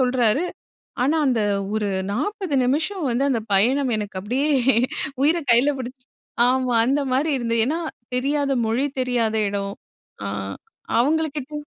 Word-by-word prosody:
சொல்றாரு. 250 +2 +2 0.6
ஆனா 285 +5 +2
அந்த 245 -4 +2 0.3
ஒரு 210 -1 0 0.2
40 370 - -2
நிமிஷம் 315 +7 0
வந்து 245 +3 +1
அந்த 245 - +1
பயணம் 255 +7 +3
எனக்கு 205 -3 -4
அப்டியே 260 +9 0 0.7
உயிர 315 +5 +4
கைல 240 +5 +5
பிடிச்சு 255 0 -7 0.4
ஆமா 255 -1 +1
அந்த 275 +3 +2
மாரி 280 +5 +1
இருந்தது. 230 -1 0
ஏன்னா 315 +6 -1 0.4
தெரியாத 280 +2 0
மொழி, 230 +5 +1
தெரியாத 240 -3 0
இடம் 200 0 -3 0.5
அ - - -2 0.7
அவங்கள 315 +5 +2
கேட்டிங் 295 +2 -5
255 Hz, 130 wpm, -22 LUFS, 235-290 Hz, 0.7 s, கைல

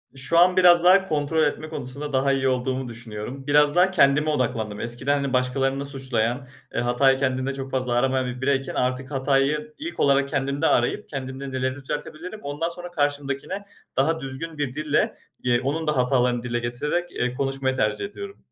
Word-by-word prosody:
Şu 135 +6 +1
an 180 +1 +5
biraz 175 -1 +7
daha 190 +2 +6
kontrol 155 0 +1
etme 155 +1 -1
konusunda 145 0 -5
daha 135 +1 +2
iyi 135 -1 +1
olduğumu 130 0 -1
düşünüyorum. 120 +3 -7
Biraz 145 +1 +4
daha 185 +2 +5
kendime 150 -2 +4
odaklandım. 115 -7 -1
Eskiden, 120 +4 -1
hani, 135 -1 -3
başkalarını 135 +2 0
suçlayan, 130 -2 -1 0.3
eee, - - -1
hatayı 130 +2 +3
kendinde 130 0 -1
çok 135 0 -6
fazla 130 -2 -1
aramayan 130 +1 +1
bir 125 +1 -5
bireyken 135 0 0
artık 130 +2 -1
hatayı 140 +3 +1
ilk 330 +3 -6
olarak 140 0 +3
kendimde 140 +2 0
arayıp 120 - +1
kendimde 135 -1 -6
neleri 130 0 -1
düzeltebilirim 155 +8 -6
ondan 145 +4 -2
sonra 175 +1 -8
karşımdakine 145 +5 -2 0.3
daha 160 +4 +2
düzgün 145 +4 -6
bir 140 -4 -2
dille, 150 0 0 0.3
eee, 120 -1 +3
onun 155 +3 -2
da 150 -3 +1
hatalarını 125 -1 +2
dile 120 -1 -2
getirerek, 150 +9 -2
eee, 125 0 -2
konuşmayı 135 0 -1
tercih 105 - 0
ediyorum. 400 - -8
135 Hz, 170 wpm, -24 LUFS, 130-150 Hz, 0.3 s, biraz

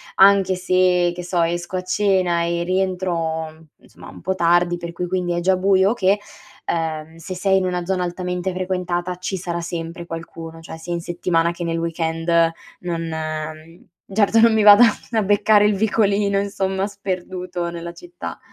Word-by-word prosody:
anche 195 -1 +5
se, 180 -1 +2
che 180 - -6
so, 175 0 0
esco 175 +2 -2
a 180 - -3
cena 185 -2 +1
e 170 0 -1
rientro 170 -4 -2
insomma - - -14
un - - -12
po' 190 - -1
tardi, 175 0 +2
per 170 0 -6
cui 180 +1 -4
quindi 180 -1 -1
è - - +1
già 190 +2 +3
buio 190 +1 +3
o - - +1
che, 200 -3 +2 0.5
ehm, 160 -1 -3
se 165 +3 -7
sei 190 +1 +2
in 190 - 0
una 180 -1 -2
zona 185 0 -1
altamente 180 +1 -3
frequentata 180 -1 -2
ci 185 +1 -3
sarà 170 -1 -4
sempre 170 0 -5
qualcuno, 165 0 -8
cioè 165 0 -9
sia 165 +2 -8
in 170 - -2
settimana 170 -1 0
che 175 0 -6
nel 165 0 -1
weekend 165 0 -3 0.5
non, 170 -2 -3
mhmm, 155 +1 -6 0.3
certo 215 +2 +3
non 230 0 +6
mi 220 -1 +3
vada 205 +3 +9 0.3
a 225 -2 +2
beccare 205 +1 +4
il 210 - +1
vicolino, 200 -1 +1
insomma, 195 -1 -1
sperduto 185 -3 -4
nella 170 0 -7
città. 350 - -9
180 Hz, 175 wpm, -21 LUFS, 170-190 Hz, 0.5 s, vada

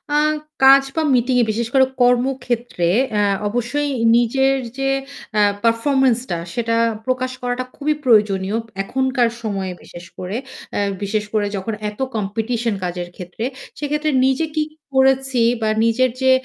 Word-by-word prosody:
আ - - +1 0.5
কাজ 270 +1 +8
বা 320 - +2
মিটিং 250 +1 +2
এ - - +4
বিশেষ 230 +1 -1
করে 265 -1 +6 0.2
কর্মক্ষেত্রে 245 -6 +1 0.2
অ্যা 210 -1 +2
আ - - -9
অবশ্যই 245 +6 -1 0.3
নিজের 265 +3 +2 0.2
যে 270 0 0 0.5
আ - - +5 0.2
পারফরম্যান্সটা 240 -3 +2 0.2
সেটা 230 -1 0 0.3
প্রকাশ 255 0 -1
করাটা 245 +1 -2
খুবই 305 +1 0
প্রয়োজনীয়। 210 -4 +3 0.3
এখনকার 260 +2 +1
সময়ে 195 -4 -3
বিশেষ 175 - -11
করে, 185 +3 -4 0.4
আ - - 0 0.2
বিশেষ 210 +1 -1
করে 210 -2 +1
যখন 195 +4 -3 0.2
এত 210 - -16 0.2
কম্পিটিশন 225 +2 -1
কাজের 175 0 -4
ক্ষেত্রে 180 +5 -6 0.3
সেক্ষেত্রে 300 +1 -1 0.2
নিজে 270 +5 +1
কি 310 - +3 0.3
করেছি 265 -1 +3 0.2
বা 220 - +1 0.2
নিজের 250 +3 +2
যে 260 - +5
240 Hz, 140 wpm, -20 LUFS, 215-265 Hz, 0.5 s, কাজ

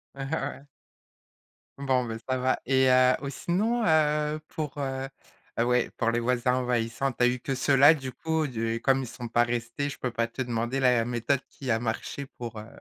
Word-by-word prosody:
Ouais. 135 0 -4 1.1
Bon, 130 -3 +1
beh, 115 -1 -4
ça 130 - +1
va 130 +1 +1
et 130 -1 +4
heu, 130 0 +5
ou 140 - -3
sinon, 215 - 0
heu, 150 -3 +2
pour, 150 -2 -5
heu 135 -1 -3 0.5
heu, - - +4
ouais, 125 0 +2
pour 115 0 +1
les 120 - 0
voisins 125 +1 +1
envahissants, 125 +1 0
tu 125 - -1
as - - +6
eu 125 +1 0
que 135 +2 -3
ceux 135 +2 +2
là, 145 +4 +8
du 130 -3 -6
coup? 160 +4 -1
Du 115 -2 -2
comme 135 0 +3
ils 130 - -5
sont 120 +1 -7
pas 120 +1 +3
restés, 120 +4 -2
je - - -7
peux 125 - -3
pas 115 0 0
te 130 +3 -4
demander 120 +2 -2
la 125 -3 +4
méthode 120 +3 0
qui 130 -3 -4
a 115 - +2
marché 120 +4 -4
pour, 115 -2 -6
heu 110 - -9
130 Hz, 205 wpm, -27 LUFS, 120-140 Hz, 1.1 s, là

